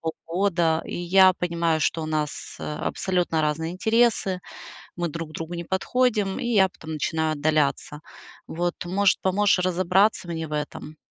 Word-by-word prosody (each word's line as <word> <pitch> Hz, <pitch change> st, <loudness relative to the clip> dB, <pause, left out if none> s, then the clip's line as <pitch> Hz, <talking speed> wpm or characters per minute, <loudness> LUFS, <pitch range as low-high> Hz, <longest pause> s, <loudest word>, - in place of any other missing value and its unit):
полгода, 165 Hz, 0 st, 0 dB
и -, -, -6 dB
я 185 Hz, +2 st, +5 dB
понимаю, 170 Hz, -3 st, -1 dB
что 160 Hz, +2 st, 0 dB
у -, -, -4 dB
нас, 155 Hz, -1 st, -3 dB
э, -, -, -9 dB
абсолютно 180 Hz, -1 st, -1 dB
разные 155 Hz, +2 st, -1 dB
интересы, 220 Hz, -2 st, +1 dB, 0.6 s
мы 175 Hz, 0 st, -1 dB
друг 165 Hz, 0 st, -6 dB
другу 165 Hz, +2 st, -6 dB
не 170 Hz, 0 st, -4 dB
подходим. 210 Hz, +1 st, 0 dB
И -, -, -3 dB
я 205 Hz, -5 st, +4 dB
потом 160 Hz, -3 st, -11 dB
начинаю 160 Hz, +1 st, -1 dB
отдаляться. 150 Hz, 0 st, 0 dB, 0.5 s
Вот, 175 Hz, +1 st, -2 dB
может, 195 Hz, +2 st, +2 dB
поможешь 190 Hz, 0 st, +2 dB
разобраться 185 Hz, +2 st, +2 dB
мне 160 Hz, -1 st, -4 dB
в 150 Hz, -, -14 dB
этом? 150 Hz, +1 st, -5 dB
170 Hz, 150 wpm, -24 LUFS, 160-190 Hz, 0.6 s, я